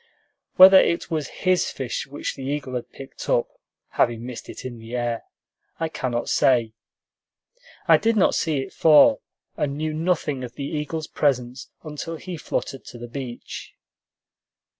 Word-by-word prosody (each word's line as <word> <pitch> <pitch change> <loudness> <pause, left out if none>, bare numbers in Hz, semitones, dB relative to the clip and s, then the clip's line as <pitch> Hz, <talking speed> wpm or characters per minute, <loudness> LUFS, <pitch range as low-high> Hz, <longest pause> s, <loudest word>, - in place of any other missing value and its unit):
Whether 190 +1 +10
it 170 0 0
was 155 -3 -1 0.2
his 185 -1 +3
fish 135 +1 -4
which 145 +1 -4
the - - -10
eagle 135 -1 -3
had 125 -1 -4
picked 135 - -10
up - - +2 0.4
(having 115 0 0
missed 125 -2 -8
it - - -9
in 120 -2 -6
the 115 +2 -7
air) 120 -1 -2 0.5
I 165 -1 -1
cannot 125 -6 -2
say. 120 -4 +3 1.1
I - - +7
did 230 0 +1
not 200 - +4
see 155 -4 0
it - - -8
fall, 160 - +6 0.4
and 140 -1 -1
knew 155 0 -2
nothing 155 -5 -1
of 120 -1 -7
the 140 - -4
eagle's 155 +1 -3
presence 130 -3 -1
until 155 +1 -6
he 180 +2 -7
fluttered 135 -3 -4
to - - -10
the 120 0 -8
beach. 120 0 -7
140 Hz, 160 wpm, -24 LUFS, 125-160 Hz, 1.1 s, Whether